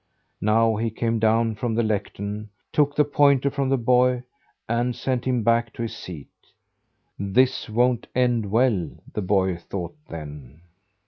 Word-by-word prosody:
Now 110 +2 +3
he 115 +1 0
came 115 +1 -1
down 115 +1 +2
from 115 +1 -2
the 120 - +2
lectern, 105 0 -3 0.2
took 145 -1 +2
the 150 - +4
pointer 140 -1 +3
from 140 -1 -1
the 135 - +3
boy, 125 +1 +3 0.4
and 120 +1 0
sent 130 -2 -2
him 125 -3 +1
back 115 +1 +2
to 115 - -4
his 115 - -4
seat. 80 -6 -9 0.9
"This 125 +6 +1
won't 120 +2 +1
end 120 -4 +1
well," 110 - +2 0.2
the 105 - -2
boy 95 -2 +1
thought 85 - -6
then. 75 -2 -9
115 Hz, 150 wpm, -24 LUFS, 100-125 Hz, 0.9 s, the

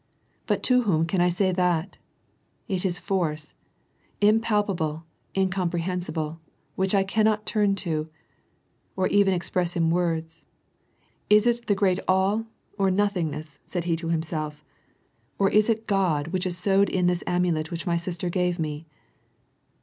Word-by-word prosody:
' - - -41
But - - 0
to 250 -1 +4
whom 165 -8 +2
can 175 +1 0
I 180 - +4
say 185 +2 +1
that! 180 0 0 0.7
Is 190 -3 -2
it 180 -2 0
force 160 -6 -2 0.3
— - - -40
impalpable, 205 -8 0 0.3
incomprehensible, 175 -3 -1 0.4
which 190 +1 +1
I 195 - +4
cannot 215 +2 +1
tnm 205 -2 +1
to, 160 -4 -2 0.9
or 190 - +1
even 200 -1 +4
express 175 0 -1
in 165 -1 +2
words, 165 -2 -1 0.9
is 210 +1 +6
it 240 0 +1
the 205 - +3
great 190 -2 +2
All 195 +4 +2 0.3
or 195 -1 +3
noth 205 +2 +2
ingness," 155 -4 -4
said 175 -2 -3
he 170 -1 0
to 165 0 -5
himself, 155 -2 -3 0.3
'' - - -42
or 195 -1 +2
is 210 +2 +4
it 225 0 0
God 175 -7 +1
which 185 +1 -1
is 175 -1 -3
sewed 195 +2 +3
in 180 -1 0
this 180 -1 +1
amulet 175 -3 0
which 170 -1 -5
my 170 - +1
sister 170 +1 -3
gave 180 0 0
me 155 -1 -4
180 Hz, 155 wpm, -25 LUFS, 165-195 Hz, 0.9 s, is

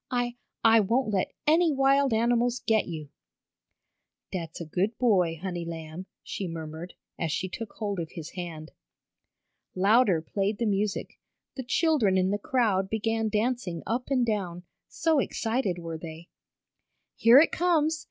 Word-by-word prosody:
"I 245 -1 -1 0.3
I 225 0 +7
won't 220 +2 +1
let 190 - 0
any 325 +2 +4
wild 275 0 +3
animals 240 +2 +2
get 220 -1 +2
you!" 155 -4 -6 1.2
"Dat's 165 -3 -5
a 170 - -5
good 190 +8 -1
boy, 185 -9 +2
honey 175 -1 -4
lamb!" 165 +2 -7 0.2
she 195 - -4
murmured, 165 +1 -7 0.2
as 165 -2 -1
she 185 - -1
took 215 +3 -7
hold 205 -4 -3
of 165 -2 -5
his 160 -2 -7
hand. 165 -4 -7 1.0
Louder 200 -1 +4
played 200 +4 -1
the 235 - -1
music. 205 -1 -2 0.4
The 265 - -4
children 255 - +2
in 185 +1 +2
the 205 - -1
crowd 205 -5 +1
began 225 +1 0
dancing 210 -6 -1
up 245 +3 -2
and 255 -3 +2
down, 185 -6 -2 0.2
so 320 -2 +1
excited 225 -7 -1
were 165 -2 -6
they. 160 +1 -9 0.9
"Here 230 +3 +7
it 310 - +6
comes! 320 -3 +1
205 Hz, 150 wpm, -27 LUFS, 175-245 Hz, 1.2 s, I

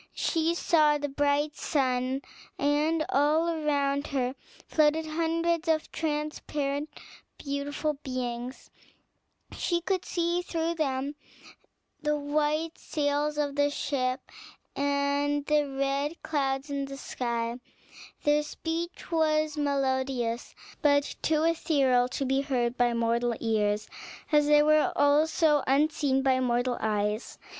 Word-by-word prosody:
She 330 0 +1
saw 305 -3 +3
the 290 0 -3
bright 290 +2 +1
sun, 260 -3 0 0.3
and 305 +3 +1
all 300 +4 +3
around 285 -3 0
her 260 -2 -1 0.3
floated 310 +1 +2
hundreds 330 +1 0
of 315 -1 +1
transparent 300 -1 -2 0.5
beautiful 285 +2 -2
beings; 250 -1 -5 0.8
she 345 -1 0
could 370 +1 -1
see 345 0 0
through 335 -1 -2
them 280 -3 -1 0.9
the 300 -1 +1
white 300 +2 -1
sails 295 0 -1
of 290 -2 -1
the 285 0 +3
ship, 260 -2 -1 0.5
and 285 0 0
the 300 -1 +2
red 275 +3 -1
clouds 275 -2 -1
in 280 -1 -1
the 275 0 -8
sky; 235 -2 -3 0.6
their 295 0 +3
speech 330 +4 -5
was 310 -2 +2
melodious, 265 -4 -1 0.3
but 285 -1 +2
too 310 0 +2
ethereal 275 -7 +2
to 270 +2 -3
be 270 +1 +1
heard 250 -4 0
by 245 -1 +2
mortal 235 +1 +1
ears, 210 -2 0 0.4
as 295 -1 +4
they 295 0 +6
were 305 0 +4
also 295 +1 +3
unseen 275 -1 +2
by 260 -1 +3
mortal 245 0 0
eyes. 210 0 -1
285 Hz, 115 wpm, -28 LUFS, 265-310 Hz, 0.9 s, they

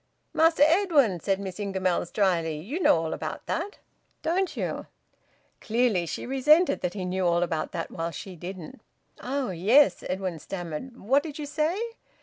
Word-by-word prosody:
"Master 320 -2 +5
Edwin," 310 - +3
said 195 +2 0
Miss 190 -1 -6
Ingamells 190 -4 -1
drily. 170 -6 +1
"You 245 - -4
know - - +5
all 160 -1 -2
about - - -5
that, 410 - -3 0.5
don't 360 +3 0
you?" - - -3 0.7
Clearly 225 -6 +1
she - - -4
resented 280 +5 +4
that 180 +2 -2
he 190 -3 -3
knew 185 +1 -1
all 170 0 +3
about 165 -3 -2
that 165 - -4
while 165 0 -3
she 180 +3 -8
didn't. 180 +7 -8 0.4
"Oh! 260 -4 -2
Yes," 215 - +4
Edwin 185 -3 -2
stammered. 175 - -6
"What 265 +7 +2
did 305 -1 -7
you 300 - -4
say?" 305 +5 0
200 Hz, 160 wpm, -27 LUFS, 175-285 Hz, 0.7 s, Master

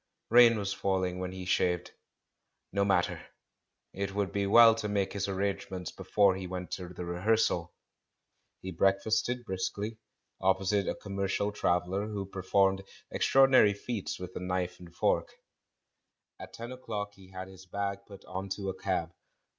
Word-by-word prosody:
Rain 120 -1 +8
was 100 -1 -2
falling 95 -2 -1
when 90 0 -3
he 95 0 -7
shaved. 90 -1 +1 0.8
ISTo 100 0 +2
matter 95 -3 +1 0.3
— - - -54
it 100 0 -4
would 100 -2 0
be 100 -1 0
well 115 +2 +8
to 105 -1 -3
make 100 -2 0
his 100 -1 -2
arrangements 95 -2 -3
be - - -10
fore 100 -2 +4
he 95 -1 -5
went 90 0 -6
to 90 -2 -4
the 90 0 -7
rehearsal! 90 -1 +1 0.9
He 95 - -5
breakfasted 110 +7 +1
briskly, 100 +3 -3 0.4
opposite 95 +1 +2
a - - -1
commercial 100 +1 -2
traveller 95 +1 0
who 105 -2 -4
per 95 0 -7
formed 95 +1 +3 0.3
extraordinary 130 -6 +5
feats 105 0 -4
with 90 0 -7
a - - -3
knife 90 0 -2
and 90 -1 -12
fork. 85 - 0 1.0
At - - -10
ten 115 +2 -7
o'clock 105 -5 -5
he 95 -2 -17
had 95 0 -7
his 95 0 -14
bag 100 +1 -2
put 100 -2 -12
on 95 +1 -5
to 100 -2 -4
a - - -2
cab. 90 -3 -2
95 Hz, 160 wpm, -30 LUFS, 95-105 Hz, 1.0 s, Rain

